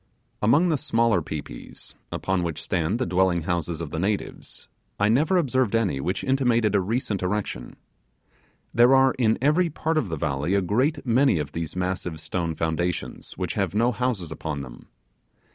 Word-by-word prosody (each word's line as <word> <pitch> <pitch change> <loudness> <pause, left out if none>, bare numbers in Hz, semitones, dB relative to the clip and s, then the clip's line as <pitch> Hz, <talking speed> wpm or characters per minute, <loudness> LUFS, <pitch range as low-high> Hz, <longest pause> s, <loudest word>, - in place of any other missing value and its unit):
Among 145 +12 +4
the 155 -4 +1
smaller 115 -7 +2
pi 75 -1 -4
pis, - - -9 0.2
upon 95 -1 -1
which 85 -3 -3
stand 90 +4 -1
the 130 - -1
dwelling 90 -3 +2
houses 85 -1 -2
of 80 -3 -5
the 80 - -3
natives, 100 +3 -3 0.3
I 105 +1 +3
never 150 - +3
observed 130 - +1
any 100 -12 +1
which 90 +6 -2
intimated 120 -5 +2
a 100 - +3
recent 105 0 -1
erection. 90 -10 -3 1.0
There 120 +3 +6
are 135 -1 +5
in 110 -3 +3
every 165 +5 +3
part 160 +1 0
of 110 - -3
the 80 - -3
valley 75 +5 -1
a 100 - +3
great 130 - 0
many 125 -3 +3
of 75 -2 -3
these 85 0 -4
massive 90 -3 -2
stone 85 +1 -3
foundations 80 +2 -2
which - - -2
have - - -1
no 120 +3 +3
houses 115 -8 -2
upon 75 -2 -4
them. 60 -3 -11
100 Hz, 175 wpm, -25 LUFS, 85-125 Hz, 1.0 s, There